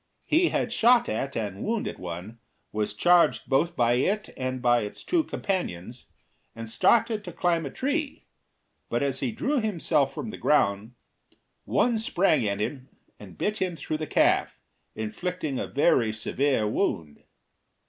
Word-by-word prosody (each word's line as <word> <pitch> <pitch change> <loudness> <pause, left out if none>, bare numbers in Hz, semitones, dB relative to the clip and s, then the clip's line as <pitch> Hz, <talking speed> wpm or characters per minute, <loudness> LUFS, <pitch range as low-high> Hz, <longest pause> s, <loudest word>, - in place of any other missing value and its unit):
He 335 +3 +3
had 235 - -1
shot 240 +1 +4
at 135 0 -3
and 105 -3 -4
wounded 225 -1 -2
one, 90 +6 -7 0.3
was 105 -1 -2
charged 170 +1 +3
both 165 +6 +1
by 120 0 +3
it 200 - 0
and 130 0 -3
by 120 -1 +3
its 105 - -6
two 340 -3 +1
companions, 125 - -4 0.5
and 115 0 -7
started 220 - +2
to 180 - -7
climb 170 -2 0
a - - -5
tree; 285 - -3 0.6
but 120 +3 0
as 135 -1 -1
he 130 - -1
drew 280 - 0
himself 165 - +1
from 220 - -6
the - - -8
ground, 110 -4 +1 0.7
one 235 -2 +2
sprang 175 - +2
at 100 0 -2
him 130 +4 -4 0.3
and 95 -4 -12
bit 210 +1 -1
him 185 -4 -1
through 155 +1 -4
the 155 0 -5
calf, - - +2 0.4
inflicting 135 +7 -3
a - - -3
very 130 -6 +2
severe 110 +2 0
wound. 80 -7 -2
140 Hz, 155 wpm, -26 LUFS, -, 0.7 s, shot